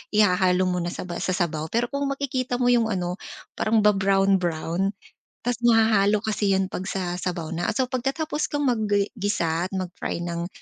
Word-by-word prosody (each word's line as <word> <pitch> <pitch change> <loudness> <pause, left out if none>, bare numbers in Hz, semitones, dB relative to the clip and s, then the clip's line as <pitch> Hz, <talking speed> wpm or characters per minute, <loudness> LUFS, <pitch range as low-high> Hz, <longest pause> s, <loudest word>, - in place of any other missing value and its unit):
ihahalo 185 -3 +4
mo 180 -1 0
na 175 - -2
sa 175 - -5
ba 175 -1 -5
sa 185 - -1
sabaw. 160 -4 -1
Pero 235 +6 -1
kung 280 0 -1
makikita 265 -3 -2
mo 245 0 +2
yung 235 -2 +3
ano, 180 -2 -2 0.4
parang 220 -1 +2
ba-brown-brown, 195 -2 +2 0.5
tapos 245 0 -1
mahahalo 215 -3 +4
kasi 205 -2 +1
yun 190 0 +1
'pag 190 - -4
sa 180 -2 -3
sabaw 175 -3 -3
na. 170 +1 -1
So 255 +1 +1
pagkatapos 275 +4 -1
kang 290 0 0
magi 210 -4 +1
gisa 175 -4 0
at - - -27
mag-fry 180 -2 -4
ng, 170 0 -3
195 Hz, 175 wpm, -24 LUFS, 180-230 Hz, 0.5 s, ihahalo